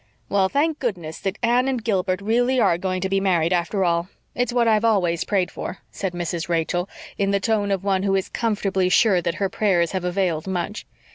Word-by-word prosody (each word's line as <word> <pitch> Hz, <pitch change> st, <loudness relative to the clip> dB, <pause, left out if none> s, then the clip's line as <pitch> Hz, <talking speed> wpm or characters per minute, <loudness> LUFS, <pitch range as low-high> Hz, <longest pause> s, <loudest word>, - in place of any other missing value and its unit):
"Well, 195 Hz, -1 st, +2 dB
thank 300 Hz, +4 st, 0 dB
goodness 175 Hz, -, -4 dB
that 195 Hz, +1 st, -3 dB
Anne 245 Hz, +2 st, +3 dB
and 255 Hz, -4 st, -1 dB
Gilbert 190 Hz, -4 st, 0 dB
really 245 Hz, +5 st, +2 dB
are 170 Hz, -7 st, +3 dB
going 185 Hz, 0 st, -2 dB
to 190 Hz, -, 0 dB
be 195 Hz, 0 st, +2 dB
married 180 Hz, -3 st, +2 dB
after 180 Hz, +2 st, 0 dB
all. 170 Hz, +1 st, 0 dB, 0.2 s
It's 245 Hz, -1 st, -1 dB
what 240 Hz, -1 st, +2 dB
I've 215 Hz, -1 st, +3 dB
always 180 Hz, -7 st, +2 dB
prayed 190 Hz, -3 st, 0 dB
for," 185 Hz, -, -6 dB
said 190 Hz, -2 st, -4 dB
Mrs. 175 Hz, 0 st, -3 dB
Rachel, 175 Hz, +2 st, 0 dB, 0.3 s
in 200 Hz, -1 st, +1 dB
the 200 Hz, 0 st, +2 dB
tone 205 Hz, 0 st, 0 dB
of 195 Hz, -1 st, -1 dB
one 195 Hz, -2 st, +1 dB
who 195 Hz, 0 st, +1 dB
is 190 Hz, -, 0 dB
comfortably 195 Hz, -5 st, 0 dB
sure 190 Hz, -2 st, +4 dB
that 170 Hz, -1 st, -2 dB
her 195 Hz, -, 0 dB
prayers 185 Hz, -4 st, +1 dB
have 190 Hz, -2 st, -2 dB
availed 180 Hz, -3 st, -1 dB
much. 190 Hz, +2 st, -3 dB
195 Hz, 210 wpm, -23 LUFS, 175-215 Hz, 0.3 s, sure